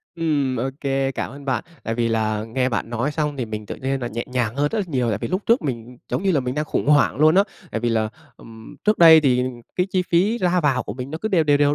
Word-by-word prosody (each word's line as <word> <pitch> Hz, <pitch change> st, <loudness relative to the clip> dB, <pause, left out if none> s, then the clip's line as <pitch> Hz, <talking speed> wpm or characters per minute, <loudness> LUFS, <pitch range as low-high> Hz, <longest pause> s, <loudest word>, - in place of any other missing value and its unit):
Ừm, 145 Hz, -6 st, 0 dB
ô 125 Hz, +3 st, -1 dB
kê, 135 Hz, -1 st, 0 dB
cảm -, -, -4 dB
ơn 140 Hz, +2 st, -11 dB
bạn. 130 Hz, -4 st, -1 dB, 0.2 s
Tại 115 Hz, -, -3 dB
vì 115 Hz, 0 st, 0 dB
là 110 Hz, -1 st, 0 dB
nghe 125 Hz, +3 st, -1 dB
bạn 115 Hz, -1 st, -3 dB
nói 120 Hz, +5 st, -1 dB
xong 150 Hz, -2 st, -2 dB
thì 125 Hz, -, -2 dB
mình 110 Hz, -1 st, -6 dB
tự -, -, -5 dB
nhiên 135 Hz, +1 st, -2 dB
là 120 Hz, -, -3 dB
nhẹ 120 Hz, +1 st, -4 dB
nhàng 120 Hz, -3 st, -1 dB
hơn 145 Hz, +1 st, +2 dB
rất 225 Hz, -, -2 dB
là 205 Hz, -, 0 dB
nhiều, 130 Hz, -6 st, 0 dB
tại 105 Hz, -3 st, 0 dB
vì -, -, -4 dB
lúc 185 Hz, +3 st, -1 dB
trước 230 Hz, -4 st, +3 dB
mình 125 Hz, -3 st, -5 dB
giống -, -, -2 dB
như 195 Hz, -, +2 dB
là 150 Hz, -, +2 dB
mình 125 Hz, 0 st, -3 dB
đang 150 Hz, +1 st, -1 dB
khủng 150 Hz, -, -2 dB
hoảng 145 Hz, -1 st, +4 dB
luôn 155 Hz, +3 st, +5 dB
á. 195 Hz, -, +6 dB, 0.3 s
Tại 110 Hz, -, -3 dB
vì 120 Hz, -, 0 dB
là, 110 Hz, -2 st, +1 dB, 0.3 s
ừm, 110 Hz, -1 st, -13 dB
trước 215 Hz, 0 st, +2 dB
đây 160 Hz, -2 st, +9 dB
thì 125 Hz, -4 st, +2 dB, 0.3 s
cái 180 Hz, +1 st, +2 dB
chi 185 Hz, -1 st, +1 dB
phí 195 Hz, +7 st, +2 dB
ra 180 Hz, -3 st, +2 dB
vào 135 Hz, -4 st, +1 dB
của -, -, -6 dB
mình 130 Hz, +2 st, -6 dB
nó 160 Hz, -, -5 dB
cứ 215 Hz, -, -2 dB
đều 180 Hz, -6 st, +2 dB
đều, 145 Hz, -1 st, +4 dB
đều 145 Hz, 0 st, +3 dB
135 Hz, 290 wpm, -22 LUFS, 120-160 Hz, 0.3 s, đây